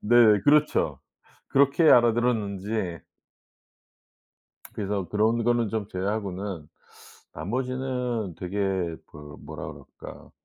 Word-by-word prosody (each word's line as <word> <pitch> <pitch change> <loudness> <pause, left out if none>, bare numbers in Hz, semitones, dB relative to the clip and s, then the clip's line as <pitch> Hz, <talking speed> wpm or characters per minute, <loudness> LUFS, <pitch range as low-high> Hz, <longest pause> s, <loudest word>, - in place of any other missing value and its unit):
네. 120 +3 +3 0.3
그렇죠. 150 +1 +3 0.5
그렇게 140 +4 +3
알아들었는지 110 -6 +1 1.7
그래서 100 -2 -3
그런 110 +2 +1
거는 120 -2 +1
좀 110 -3 -3
제외하고는 95 -4 -4 0.7
나머지는 125 0 -3
되게 90 +3 -6 0.5
그 75 -1 -12
뭐라 - - -8 0.3
그럴까 - - -11
110 Hz, 220 characters per minute, -26 LUFS, 95-120 Hz, 1.7 s, 네